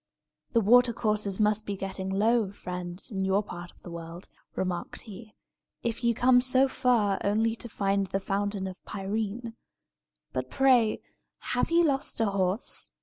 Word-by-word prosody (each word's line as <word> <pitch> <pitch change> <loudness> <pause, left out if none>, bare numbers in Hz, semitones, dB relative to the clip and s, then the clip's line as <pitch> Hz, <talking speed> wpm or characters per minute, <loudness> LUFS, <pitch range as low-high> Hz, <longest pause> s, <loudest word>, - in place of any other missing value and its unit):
"The 230 - +4
watercourses 215 -3 +3
must 215 0 +2
be 200 - -2
getting 190 0 -4
low, 215 +1 +2
friend, 180 -2 -6
in 190 -2 -2
your 190 +2 +2
part 175 -2 -8
of - - -28
the 175 - -9
world," 170 +1 -8 0.3
remarked 180 -2 -2
he, 215 0 -11 0.5
"if 235 +1 -2
you 235 -1 +3
come 250 +1 +5
so 260 +1 +4
far 230 -7 +2
only 220 +3 +1
to 240 - -8
find 200 -1 0
the 195 - -1
Fountain 200 0 -2
of 190 -1 -8
Pirene. 215 +3 -4 0.8
But, 130 0 -3
pray, 250 - +3 0.5
have - - +1
you 340 +1 +4
lost 275 -6 0
a 225 - +3
horse? 195 +1 0
205 Hz, 155 wpm, -28 LUFS, 190-235 Hz, 0.8 s, come